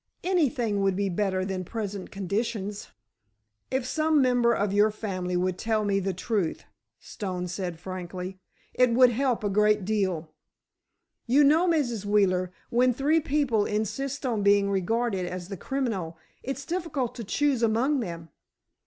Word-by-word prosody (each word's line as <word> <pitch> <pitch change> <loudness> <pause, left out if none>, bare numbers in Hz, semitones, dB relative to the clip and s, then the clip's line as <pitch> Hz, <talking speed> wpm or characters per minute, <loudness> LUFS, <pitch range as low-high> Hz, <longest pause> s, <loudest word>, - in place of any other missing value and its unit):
Anything 270 - +1
would 195 -1 +2
be 200 0 0
better 185 0 0
than 190 -1 -3
present 200 -1 -5
conditions!" 205 +1 -3 0.8
"If 260 -1 -1
some 310 +3 +2
member 245 -3 +3
of 205 -3 0
your 205 +1 +5
family 185 -4 -3
would 185 0 -1
tell 220 -1 0
me 200 -1 +2
the 195 0 -1
truth," 185 -1 -2 0.4
Stone 180 -4 -5
said 175 -1 -4
frankly, 185 +1 -6 0.3
"it 250 0 +4
would 250 0 +6
help 250 -1 0
a - - +1
great 210 0 +2
deal. 185 -7 -1 1.0
You 275 +5 +5
know, 315 +5 +4
Mrs. 245 - 0
Wheeler, 190 -3 +2 0.2
when 250 +1 +3
three 295 +5 +3
people 280 -8 +1
insist 270 +7 -2
on 230 -5 0
being 200 0 +4
regarded 195 0 0
as 180 0 -6
the 195 - -4
criminal, 200 -11 -3 0.2
it's 270 +1 -5
difficult 325 -7 -2
to 235 - -6
choose 275 +4 +1
among 235 +6 +2
them. 170 -7 -6
210 Hz, 150 wpm, -27 LUFS, 190-255 Hz, 1.0 s, would